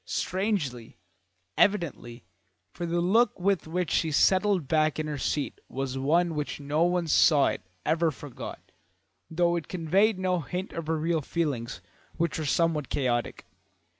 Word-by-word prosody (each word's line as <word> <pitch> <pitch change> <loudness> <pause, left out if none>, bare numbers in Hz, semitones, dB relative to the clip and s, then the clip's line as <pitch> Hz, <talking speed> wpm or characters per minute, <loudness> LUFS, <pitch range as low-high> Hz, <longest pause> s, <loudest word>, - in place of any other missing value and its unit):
Strangely, 180 - -2 0.6
evidently, 145 - 0 0.5
for 175 - -4
the 170 +1 0
look 215 +6 +3
with 190 -2 +1
which 175 0 -2
she 160 - +1
settled 190 0 +3
back 155 0 +2
in 155 - -2
her 150 -2 -4
seat 145 +2 -2
was 135 0 -3
one 165 +6 +2
which 150 -1 -3
no 145 +2 -1
one 175 0 +1
who - - -7
saw 150 -2 +5
it - - -4 0.2
ever 165 +1 +2
forgot, 145 -3 -9 0.6
though 170 +1 +1
it 170 - -4
conveyed 185 +5 +2
no 185 -1 0
hint 180 +5 -5
of 165 -2 -5
her 160 0 0
real 160 +1 0
feelings, 135 -6 -3 0.4
which 170 -1 -1
were 155 - -2
somewhat 155 -2 +1
chaotic. 120 -4 -1
165 Hz, 155 wpm, -27 LUFS, 145-180 Hz, 0.6 s, saw